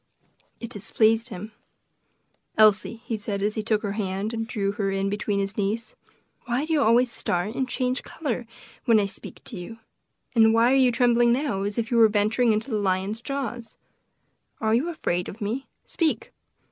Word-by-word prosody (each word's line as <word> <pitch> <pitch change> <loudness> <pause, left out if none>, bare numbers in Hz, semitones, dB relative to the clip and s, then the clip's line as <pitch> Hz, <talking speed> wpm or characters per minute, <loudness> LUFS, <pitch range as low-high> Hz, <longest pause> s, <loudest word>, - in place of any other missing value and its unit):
It 235 0 -7
displeased 225 +2 +1
him. 210 +1 -7 1.1
"Elsie," 215 +2 +4
he 230 - -2
said, 205 -2 -3
as 210 +1 +1
he 215 - -2
took 215 0 0
her 205 - -1
hand 200 +1 -2
and 225 -1 -3
drew 200 -4 -1
her 200 -1 -2
in 195 0 -1
between 205 0 -1
his 195 0 -2
knees, 215 - -2 0.5
"why 250 +5 0
do 320 - -1
you 300 - +3
always 240 0 +4
start 190 -2 -1
and 260 0 -2
change 255 0 -1
color 250 -6 -4 0.4
when 225 -2 +5
I 205 - +2
speak 195 - -9
to 225 - -9
you? 180 +6 -8 0.6
and 225 -1 +5
why 230 +2 +5
are - - +4
you 260 -2 +5
trembling 240 0 +4
now 255 -6 0
as 205 +1 -2
if 230 0 -2
you 240 - +3
were 225 -1 +8
venturing 215 +3 +2
into 220 +4 -1
the 215 - +1
lion's 195 +3 -1
jaws? 245 -4 -5 0.8
are 220 -4 +1
you 265 +9 +2
afraid 180 - -2
of 210 - -10
me? 230 +6 -3 0.2
speak!" 325 -3 -1
225 Hz, 185 wpm, -25 LUFS, 205-240 Hz, 1.1 s, were